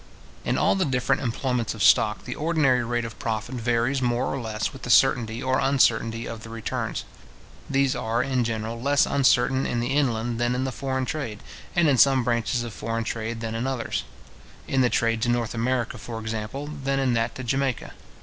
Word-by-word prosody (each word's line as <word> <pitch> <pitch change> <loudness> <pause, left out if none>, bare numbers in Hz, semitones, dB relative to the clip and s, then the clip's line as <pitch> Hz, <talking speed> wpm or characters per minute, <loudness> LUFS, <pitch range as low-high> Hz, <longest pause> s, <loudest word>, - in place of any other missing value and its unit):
In - - 0
all - - +3
the 195 - +1
different 135 -2 +1
employments 120 -1 -1
of 105 - -2
stock, 105 -1 +4
the 125 - -4
ordinary 150 -6 +2
rate 120 0 -1
of 115 - -8
profit 110 +2 -3
varies 120 +2 0
more 120 +1 0
or 135 - -3
less 110 -2 -3
with 135 - -11
the 125 - -6
certainty 120 -3 +3
or 130 0 +1
uncertainty 125 -4 +2
of 115 -1 -6
the 115 - -10
returns. 115 -1 -3 0.7
These 135 -1 +2
are, 115 +2 0
in 130 -3 0
general, 115 0 -3
less 140 +2 +3
uncertain 130 -1 +2
in 120 - -1
the 120 +3 -1
inland 120 -4 0
than 120 +1 +1
in 130 - -1
the 130 - -2
foreign 130 0 -2
trade, 120 -8 -4 0.3
and 170 -2 +4
in 135 -4 +3
some 135 -2 +5
branches 120 +1 0
of 115 -3 -6
foreign 115 +1 -3
trade 115 0 -4
than 115 -1 -3
in 115 +3 -2
others; 130 -3 -2 0.6
in 135 - +2
the 125 - +4
trade 115 -1 +1
to 120 - +1
North 120 -2 0
America, 120 0 -1
for 115 +1 -6
example, 110 +5 -4
than 140 -2 -2
in 135 -2 +1
that 115 0 0
to 130 - -6
Jamaica. 135 0 -1
120 Hz, 200 wpm, -25 LUFS, 115-135 Hz, 0.7 s, some